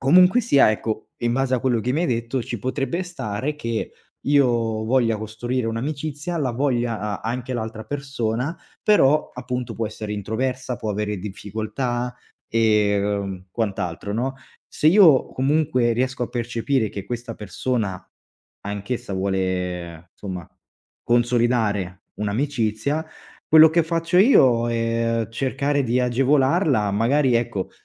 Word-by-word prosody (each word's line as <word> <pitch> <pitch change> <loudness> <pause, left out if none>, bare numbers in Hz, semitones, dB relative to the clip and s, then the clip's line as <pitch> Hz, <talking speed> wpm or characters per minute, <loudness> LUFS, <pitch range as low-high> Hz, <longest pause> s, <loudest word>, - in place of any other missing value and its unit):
Comunque 180 - +6
sia, 140 - +5
ecco, 110 0 -3
in 120 0 0
base 130 0 +1
a - - +1
quello 120 -2 +1
che 125 +3 -1
mi 155 - 0
hai - - +1
detto 115 +1 -1
ci 120 0 -5
potrebbe 135 - -2
stare 150 - -4
che 115 -5 -3 0.3
io 120 -6 +2
voglia 115 -2 +2
costruire 115 +3 -3
un'amicizia, 145 +7 -3
la 130 -5 0
voglia 120 -4 0
a 105 -1 -3
anche 125 +3 -3
l'altra 110 -2 -4
persona, 135 0 -3 0.3
però, 150 -8 +4
appunto, 125 -1 -4
può 115 -1 -2
essere 110 -1 -6
introversa, 125 +5 -2
può 110 -3 -4
avere 105 0 -2
difficoltà, 110 +5 -4 0.3
ehm, 100 -3 +1
quant'altro, 100 -4 -3
no, 125 +5 -1 0.3
se 150 - -1
io 165 -6 +6
comunque 135 -3 +2
riesco 130 +1 -1
a - - -8
percepire 120 0 -1
che 100 - -6
questa 120 -1 -5
persona 105 -2 -3 0.6
anch'essa 100 +2 -4
vuole 90 -3 -2
insomma 90 -5 -6 0.5
consolidare 120 -6 +1
un'amicizia, 120 +6 -1 0.4
quello 160 0 +8
che 170 +1 +3
faccio 165 +2 0
io 130 - +5
è 115 0 0
cercare 140 +3 0
di 120 +1 +1
agevolarla, 130 - +2
magari, 125 +5 +2
ecco, 115 -5 -1
120 Hz, 130 wpm, -23 LUFS, 110-135 Hz, 0.6 s, quello